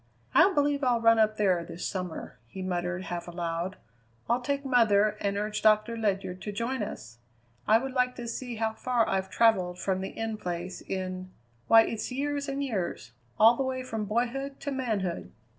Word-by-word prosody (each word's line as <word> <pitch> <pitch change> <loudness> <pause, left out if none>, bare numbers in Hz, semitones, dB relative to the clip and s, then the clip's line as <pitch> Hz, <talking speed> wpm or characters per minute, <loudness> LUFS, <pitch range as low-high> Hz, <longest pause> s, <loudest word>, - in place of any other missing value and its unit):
"I 395 - +6
believe 290 -3 +1
I'll 245 -2 +3
run 230 0 +5
up 215 0 +3
there 185 -5 +2
this 170 +1 -7
summer," 180 -3 -5
he 190 +10 -7
muttered 175 0 -2
half 175 -2 -5
aloud. 170 +2 -3 0.5
"I'll 240 +2 +1
take 280 +2 -2
mother 215 -5 +4
and 200 0 0
urge 210 +1 -2
Doctor 215 +1 +4
Ledyard 195 -4 -2
to 210 - -4
join 235 +4 -2
us. 115 - -7 0.5
I 220 - +7
would 265 +2 -4
like 250 -1 +1
to 240 -1 -6
see 245 +1 -4
how 220 0 -1
far 240 0 +1
I've 190 0 -1
travelled 190 -6 +3
from 190 0 -1
the 190 - -3
In 225 -1 -4
Place 180 -1 -5
in 185 -1 -4 0.4
why 225 0 +8
it's 225 +2 -4
years 285 +2 -2
and 275 +1 -2
years! 185 - -3 0.3
All 225 +2 +8
the 270 - -2
way 260 -1 -2
from 225 -4 -3
boyhood 245 +6 -2
to 285 - -3
manhood." 215 -10 -2
215 Hz, 185 wpm, -28 LUFS, 185-250 Hz, 0.5 s, why